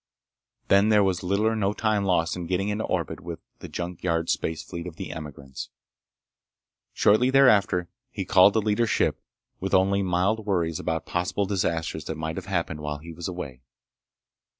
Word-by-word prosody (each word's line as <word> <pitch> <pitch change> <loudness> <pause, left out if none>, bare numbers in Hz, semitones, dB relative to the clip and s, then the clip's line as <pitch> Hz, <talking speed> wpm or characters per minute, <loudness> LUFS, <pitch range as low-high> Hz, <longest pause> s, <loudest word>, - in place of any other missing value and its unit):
Then 100 +2 +5
there 105 -2 +5
was 95 -2 0
little 100 +4 0
or 110 0 +2
no 100 -2 +1
time 105 -2 0
lost 85 -3 +1
in 90 -2 -5
getting 95 +3 0
into 105 +1 -1
orbit - - -2
with 85 -1 -7 0.2
the - - -8
junk 90 -1 -5
yard 85 -2 0
space 80 -1 -2
fleet 85 +1 -7
of 85 - -8
the - - -6
emigrants. 70 -4 -8 1.2
Shortly 115 +5 +4
thereafter 105 -10 +4 0.2
he 100 -6 -5
called 95 +2 +6
the 110 - +1
leader's 110 +2 +1
ship - - +1 0.4
with 95 - 0
only 100 +1 +3
mild 95 +4 0
worries 85 -5 0
about 80 -1 -2
possible 90 +3 -1
disasters 85 -6 -1
that 80 - -4
might 80 +1 -4
have 95 - -6
happened 85 -5 -2
while 75 0 -4
he 80 +3 -10
was 85 +1 -5
away. 75 -9 -6
90 Hz, 175 wpm, -26 LUFS, 80-100 Hz, 1.2 s, called